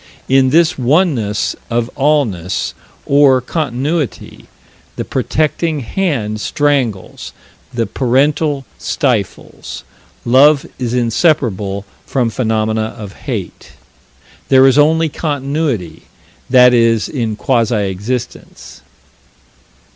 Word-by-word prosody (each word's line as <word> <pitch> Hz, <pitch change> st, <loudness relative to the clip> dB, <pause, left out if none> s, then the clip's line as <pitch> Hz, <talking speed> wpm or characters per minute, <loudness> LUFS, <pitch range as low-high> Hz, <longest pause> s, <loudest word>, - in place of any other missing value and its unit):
In 135 Hz, 0 st, +4 dB
this 160 Hz, +1 st, +3 dB
oneness 130 Hz, -, +1 dB
of 120 Hz, 0 st, -1 dB
allness, 130 Hz, -, 0 dB, 0.3 s
or 140 Hz, -2 st, +4 dB
continuity, 140 Hz, -, -3 dB, 0.5 s
the -, -, -4 dB
protecting 155 Hz, 0 st, -1 dB
hand 115 Hz, -, -2 dB
strangles; 135 Hz, -10 st, -1 dB, 0.4 s
the 115 Hz, -1 st, -1 dB
parental 140 Hz, +3 st, 0 dB
stifles; 120 Hz, -, -3 dB, 0.4 s
love 140 Hz, +4 st, +5 dB
is 125 Hz, -1 st, -2 dB
inseparable 115 Hz, -, 0 dB, 0.2 s
from 125 Hz, -4 st, -1 dB
phenomena 110 Hz, -2 st, -1 dB
of 105 Hz, -3 st, -8 dB
hate. -, -, -7 dB, 0.8 s
There 130 Hz, 0 st, +6 dB
is 135 Hz, +1 st, +4 dB
only 160 Hz, +2 st, +3 dB
Continuity 140 Hz, -, -3 dB, 0.4 s
that 125 Hz, -1 st, +6 dB
is 115 Hz, -2 st, +3 dB
in 115 Hz, -6 st, -3 dB
quasi 120 Hz, -1 st, +1 dB, 0.2 s
existence. 110 Hz, +6 st, -6 dB
130 Hz, 90 wpm, -15 LUFS, 110-145 Hz, 0.8 s, There